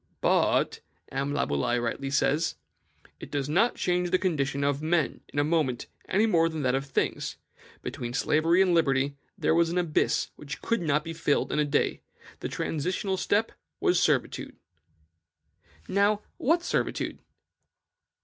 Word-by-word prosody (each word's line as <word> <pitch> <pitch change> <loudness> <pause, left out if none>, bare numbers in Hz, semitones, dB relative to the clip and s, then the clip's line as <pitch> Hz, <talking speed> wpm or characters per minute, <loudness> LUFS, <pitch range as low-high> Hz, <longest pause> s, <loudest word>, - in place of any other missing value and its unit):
"But," - - +2 0.3
M. 135 +1 -1
Laboulaye 120 - 0
rightly 120 +3 -2
says, 140 - +1 0.6
"it - - -9
did 140 -2 -2
not 195 +11 +2
change 180 0 0
the 185 - +3
condition 140 -7 0
of 140 0 +1
men 160 -1 0
in - - -8
a 145 - +4
moment, 150 -6 0 0.2
any 205 +4 +3
more 165 -6 +3
than 160 -2 -4
that 125 -1 +2
of 135 +1 -1
things; 135 - -1 0.5
between 120 0 -5
slavery 165 +7 +3
and 180 -2 +2
liberty 140 -4 +2 0.2
there - - +2
was 165 0 +3
an 175 - -2
abyss 170 -4 +1
which 150 0 -7
could 230 -3 0
not 150 -2 +1
be 165 - -5
filled 160 -3 0
in - - 0
a 150 - +3
day; 145 0 0 0.4
the - - -4
transitional 185 +5 -2
step 205 +4 +1 0.3
was - - +3
servitude." - - 0 1.3
Now, 205 +1 +2
what 330 +6 +2
was - - -11
servitude? - - -1
155 Hz, 155 wpm, -27 LUFS, 140-180 Hz, 1.3 s, a